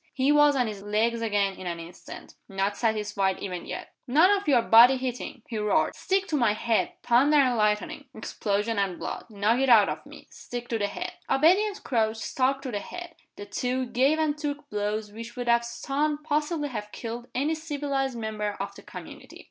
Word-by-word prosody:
He 270 +1 +3
was 295 -1 +5
on 250 -2 +2
his 210 -3 -5
legs 220 +3 0
again 205 -3 +1
in 185 - -7
an 170 -1 -3
instant 170 +2 -11 0.2
not 195 +1 -1
satisfied 210 -4 0
even 180 -3 -6
yet. - - -7
"None 315 +10 +5
of 405 -3 0
your 250 -5 +4
body 240 +4 +7
hitting!" 255 -1 -5
he 225 - -4
roared. 210 -1 +1
"Stick 385 0 0
to 310 - 0
my 235 -7 +3
head. 235 +11 0
Thunder 275 +5 +4
and 260 -4 +4
lightning! 210 -1 0
explosion 205 +2 -2
and 190 -3 -1
blood! - - -6
Knock 215 +3 +1
it 270 0 +2
out 220 -4 +7
of - - -5
me! - - -13
Stick 240 0 -7
to 230 - -1
the 205 - +1
head!" - - -5 0.2
Obedient 385 +8 +3
Crouch 225 -3 0
stuck 270 +4 0
to 260 - -4
the 205 - -2
head. 350 - -8 0.2
The 205 - -8
two 250 +5 -2
gave 260 +5 +2
and 310 -2 +1
took 295 -1 -4
blows 210 0 -2
which 230 +2 -9
would 245 -1 -4
have 235 0 +4
stunned 290 +5 -2
possibly 300 0 -1
have 210 -4 -6
killed 235 +1 -6
any 285 +5 +1
civilized 285 -5 -2
member 210 -2 -3
of - - -4
the - - -13
community. - - -11
240 Hz, 195 wpm, -27 LUFS, 210-285 Hz, 0.2 s, body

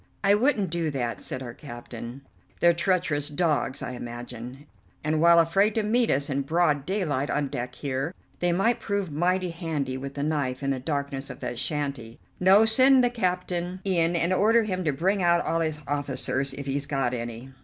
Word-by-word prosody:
"I 200 0 +5
wouldn't 210 - +2
do 170 -2 -1
that," 125 -5 -3
said 130 - -5
our 120 -2 -7
captain, 120 -1 -9 0.4
"they're 170 0 +5
treacherous 170 -4 0
dogs, 150 -3 0
I - - -4
imagine, 120 +2 -8 0.4
and, 155 +1 0
while 170 0 +7
afraid 195 +6 +3
to 220 - +1
meet 230 +3 +2
us 140 +1 +1
in 140 -1 -1
broad 150 -1 +1
daylight 155 -8 -1
on 145 -2 0
deck 125 0 -5
here, 135 +2 -3 0.3
they 175 0 +2
might 230 +7 +2
prove 200 -5 -2
mighty 180 +3 +1
handy 160 -6 -3
with 140 +1 -7
the 140 - -2
knife 145 -4 -1
in 135 - +1
the 135 - -1
darkness 140 0 -3
of - - -8
that 120 -2 -4
shanty. 140 -6 -3 0.2
No, 195 +4 +6
send 255 +3 +6
the 245 - +2
captain 180 -4 -2
in 175 -3 +2
and 170 +2 +1
order 225 +4 +4
him 185 -3 -2
to 150 - +2
bring 185 +8 0
out 170 -1 +3
all 165 - 0
his 155 -2 -1
officers, 140 -1 -1
if 140 0 -6
he's 140 +1 -1
got 135 -4 0
any." 120 +2 -6
155 Hz, 190 wpm, -26 LUFS, 135-185 Hz, 0.4 s, while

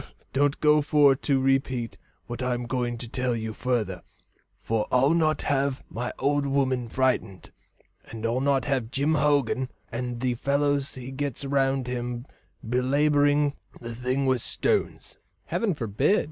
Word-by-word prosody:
"Well, - - -16 0.2
don't 140 +1 +2
go 150 0 +5
for 145 -2 +5
to 135 0 0
repeat 130 -3 0 0.3
what 120 +1 -6
I'm 125 -1 -1
going 120 -1 -2
to 120 - -7
tell 125 +1 -1
you 110 -1 -4
further, 110 -6 -1 0.6
for 110 -1 -1
I'll 135 +5 +4
not 155 -3 +2
have 140 -1 0
my 120 +2 -3
old 145 0 +1
woman 130 -3 0
frightened, 115 -7 -1 0.5
and 115 0 -7
I'll 120 +3 0
not 135 -3 +2
have 130 -5 -1
Jim 140 +5 +1
Hogan 140 -4 +2 0.2
and 120 0 -4
the 125 0 0
fellows 140 +2 0
he 130 0 -7
gets 140 0 -3
round 135 -1 +1
him 120 0 -4 0.4
belabouring 145 +3 +3 0.3
the 115 -1 -7
thing 125 +3 -1
with 130 -3 +2
stones." 430 - -2 0.3
"Heaven 210 -7 0
forbid!" 130 - +1
130 Hz, 150 wpm, -26 LUFS, 120-140 Hz, 0.6 s, go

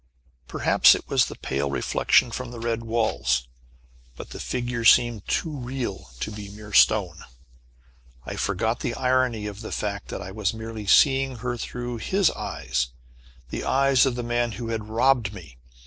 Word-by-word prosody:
Perhaps - - +5
it - - -7
was - - +3
the - - -8
pale 70 +1 -2
reflection 95 - +2
from 125 +1 -5
the 120 -1 -8
red 115 0 -2
walls, 115 - 0 0.7
but - - -9
the - - -8
figure 120 -1 -3
seemed 115 -3 +4
too 160 -3 -1
real 125 -5 -5
to 110 - -3
be 105 -1 -8
mere 105 +1 -11
stone! 95 -7 +4 1.0
I - - -5
forgot 110 +4 -1
the 115 - -3
irony 125 -4 +1
of 105 0 -6
the 110 - -7
fact 100 -1 -3
that - - -5
I 95 - -7
was 105 +1 -1
merely 110 -2 -7
seeing 135 +4 +4
her 120 +1 -3
through 120 +1 -5
his 190 - +2
eyes 65 -1 -3 0.6
the - - -4
eyes 135 0 +3
of 125 - -1
the 120 - -3
man 120 -1 -1
who 115 +3 -6
had 110 -2 -4
robbed 115 -3 +2
me. 70 -10 -12
115 Hz, 170 wpm, -25 LUFS, 105-125 Hz, 1.0 s, Perhaps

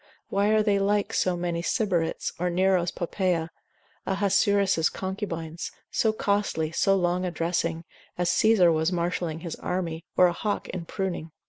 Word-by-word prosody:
Why 200 +1 +1
are 215 0 +4
they 205 -2 +2
like 205 +1 +1
so 180 -1 +1
many 175 -1 -2
Sybarites, 180 -4 -1
or 180 +1 0
Nero's 180 0 +2
Poppaea, 175 -2 -1 0.6
Ahasuerus' 200 -2 +2
concubines, 175 -4 -5 0.2
so 220 - +2
costly, 200 -7 0
so 195 +4 +3
long 180 -1 +1
a 180 - 0
dressing, 165 -1 -1 0.3
as 175 0 +1
Caesar 215 -6 +5
was 160 +2 +1
marshalling 170 -2 -2
his 170 -2 -5
army, 170 -3 -3
or 180 - +7
a 175 - +3
hawk 205 +4 -2
in 180 -2 -5
pruning? 180 -3 -3
180 Hz, 150 wpm, -26 LUFS, 170-195 Hz, 0.6 s, or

